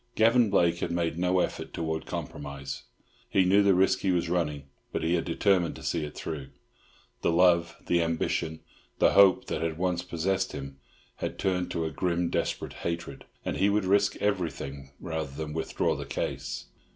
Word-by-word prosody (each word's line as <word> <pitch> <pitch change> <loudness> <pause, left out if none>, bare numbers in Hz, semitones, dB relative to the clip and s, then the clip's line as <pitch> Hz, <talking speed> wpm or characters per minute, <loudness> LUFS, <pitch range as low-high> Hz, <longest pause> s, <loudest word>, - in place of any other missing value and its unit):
Gavan 115 0 +5
Blake 85 -3 +3
had - - -1
made 85 -1 -1
no 90 0 +3
effort - - -3
towards 80 -1 -3
compromise. 70 -1 -6 0.4
He 95 - +3
knew 100 +3 +5
the 100 -2 +5
risk 95 +1 +3
he 95 - 0
was 85 -2 0
running, 75 -5 0 0.3
but - - -2
he 80 - +2
had 85 - +1
determined 90 0 +2
to - - -10
see 85 -2 -1
it 75 - -6
through. 75 -4 -5 0.7
The - - +2
love, 85 -1 +4
the 85 -1 +2
ambition, 80 -1 -1 0.4
the - - +5
hope 100 -2 +6
that 80 - -3
had 80 -1 -1
once 90 -1 0
possessed 95 +2 -1
him 70 0 -7 0.4
had - - -4
turned 90 -2 0
to 80 - -2
a 80 - -2
grim 90 -1 0
desperate - - -2
hatred, 85 -4 -4 0.2
and - - -2
he 100 - +3
would 105 -1 +1
risk 100 +1 +3
everything 80 -8 -2
rather 80 -4 -3
than 75 0 -4
withdraw 80 0 0
the 70 0 -6
case. 70 - -3
85 Hz, 180 wpm, -28 LUFS, 80-95 Hz, 0.7 s, hope